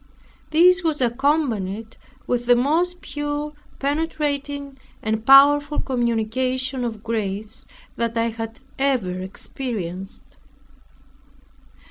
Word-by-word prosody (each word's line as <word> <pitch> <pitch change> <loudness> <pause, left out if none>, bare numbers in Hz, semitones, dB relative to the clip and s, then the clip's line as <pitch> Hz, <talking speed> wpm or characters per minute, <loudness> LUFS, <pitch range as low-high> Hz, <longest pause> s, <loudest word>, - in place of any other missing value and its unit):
This 360 +4 +5
was 315 -3 0
accompanied 235 -5 0 0.3
with 240 -1 -1
the 245 - +7
most 330 +8 +1
pure, 290 +1 -3 0.3
penetrating, 285 -2 -2 0.2
and 220 0 -1
powerful 290 +3 +6
communication 255 +2 -1
of 220 -3 -4
grace 215 -1 -3 0.3
that 230 0 -1
I 230 0 +2
had 225 +1 -6 0.2
ever 230 -10 0
experienced. 190 -1 -5
255 Hz, 90 wpm, -22 LUFS, 225-290 Hz, 0.3 s, the